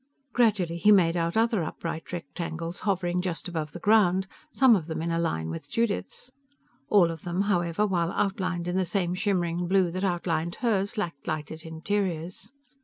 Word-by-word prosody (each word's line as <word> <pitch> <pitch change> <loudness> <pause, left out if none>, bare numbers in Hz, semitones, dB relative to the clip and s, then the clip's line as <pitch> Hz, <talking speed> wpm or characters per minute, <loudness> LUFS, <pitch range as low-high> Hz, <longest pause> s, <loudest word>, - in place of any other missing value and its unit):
Gradually 205 -8 +2
he 210 +5 +5
made 175 -4 +5
out 170 +2 0
other 225 -5 +2
upright 165 +1 -5
rectangles 170 0 -5
hovering 180 -3 0
just 180 0 -3
above 160 -4 -3
the - - -8
ground, 190 -3 +4 0.3
some 260 -4 +6
of 165 -6 -2
them 160 - -3
on 170 - -1
a 165 - 0
line 80 - -1
with 80 - -7
Judith's. 230 +2 -2 0.6
All 180 -5 +5
of 165 -2 -7
them, 175 +2 -1
however, 180 -1 +1
while 175 -4 0
outlined 185 -3 -1
in 175 +1 -1
the 190 - +2
same 175 0 0
shimmering 175 -3 0
blue 185 -1 +3
that 185 +2 -3
outlined 170 -2 -1
hers, 210 -2 0
lacked 170 -9 -4
lighted 155 +1 -4
interiors. 180 +3 -3
175 Hz, 175 wpm, -27 LUFS, 165-200 Hz, 0.6 s, some